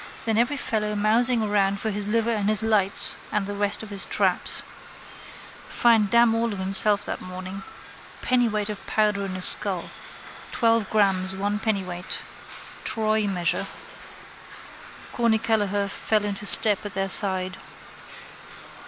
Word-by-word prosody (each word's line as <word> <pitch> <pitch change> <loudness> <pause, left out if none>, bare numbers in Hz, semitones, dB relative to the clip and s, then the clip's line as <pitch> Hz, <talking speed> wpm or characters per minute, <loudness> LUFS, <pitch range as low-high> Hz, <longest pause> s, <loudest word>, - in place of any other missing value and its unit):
Then 225 -1 -1
every 240 +6 0
fellow 210 -5 -3
mousing 225 +3 +2
around 200 -2 -1
for 220 - -3
his 205 0 -2
liver 230 +2 -1
and 210 -2 -2
his 215 -1 +1
lights 210 -3 +3
and 210 -2 -2
the 205 - -6
rest 205 +1 +1
of 220 - -11
his 200 -1 +1
traps. - - -1 1.1
Find 225 -4 +2
damn 235 0 +3
all 230 0 -2
of - - -7
himself 195 +2 +1
that - - -6
morning. 185 +1 -9 0.6
Pennyweight 225 -4 -1
of 210 - -8
powder 210 -2 -1
in 185 - -7
a 185 - -4
skull. - - +3 0.6
Twelve 230 -3 0
grammes 190 -3 0
one 205 +2 -3
pennyweight. 185 -5 -4 0.7
Troy 215 -1 -1
measure. 180 -3 -2 1.5
Corny 230 -2 +1
Kelleher 205 -3 -2
fell 210 +1 -2
into 205 0 -1
step 210 -1 +8
at 205 -3 -9
their 195 0 -2
side. 185 -2 +1
210 Hz, 140 wpm, -23 LUFS, 195-220 Hz, 1.5 s, step